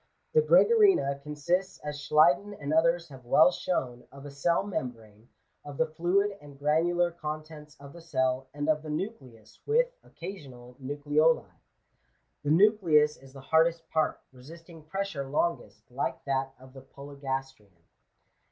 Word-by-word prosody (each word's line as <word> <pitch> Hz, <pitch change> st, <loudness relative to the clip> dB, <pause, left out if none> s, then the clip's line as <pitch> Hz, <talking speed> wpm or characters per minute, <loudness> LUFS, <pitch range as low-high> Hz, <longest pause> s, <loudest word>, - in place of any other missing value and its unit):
The 470 Hz, -, +5 dB
Oregarina 420 Hz, -, +4 dB
consists, 150 Hz, +6 st, -2 dB
as 150 Hz, -1 st, -5 dB
Schleiden 150 Hz, +7 st, +3 dB
and 145 Hz, +1 st, -3 dB
others 170 Hz, +1 st, +2 dB
have 135 Hz, -2 st, -12 dB
weU 160 Hz, +8 st, +5 dB
shown, 125 Hz, -11 st, -3 dB
of 140 Hz, 0 st, -12 dB
a 145 Hz, -, -8 dB
cell 170 Hz, +6 st, +1 dB
membrane, 115 Hz, -, -7 dB, 0.3 s
of 145 Hz, -1 st, -9 dB
the 160 Hz, -, +2 dB
fluid 185 Hz, +6 st, 0 dB
and 145 Hz, -1 st, -14 dB
granular 170 Hz, +4 st, +1 dB
contents 155 Hz, -2 st, -8 dB
of 140 Hz, 0 st, -12 dB
the 170 Hz, -, -12 dB
cell, 130 Hz, -4 st, -1 dB
and 145 Hz, +1 st, -4 dB
of 155 Hz, -1 st, +2 dB
the 155 Hz, -, -9 dB
nucleus 140 Hz, -, -7 dB
with 485 Hz, +3 st, +2 dB
(occasional) 135 Hz, -9 st, -10 dB
nucleoli. 145 Hz, +3 st, +1 dB, 1.0 s
The 145 Hz, -, -2 dB
nucleus 165 Hz, -4 st, +4 dB
is 135 Hz, 0 st, -17 dB
the 135 Hz, -, -11 dB
hardest 165 Hz, +3 st, +2 dB
part, 160 Hz, -1 st, 0 dB
resisting 165 Hz, +6 st, -14 dB
pressure 165 Hz, -4 st, -4 dB
longest, 135 Hz, -9 st, -2 dB
like 130 Hz, +3 st, -3 dB
that 135 Hz, -1 st, -2 dB
of 130 Hz, 0 st, -16 dB
the 135 Hz, -, -11 dB
Polygastrian. 135 Hz, -8 st, -7 dB
150 Hz, 145 wpm, -28 LUFS, 135-170 Hz, 1.0 s, The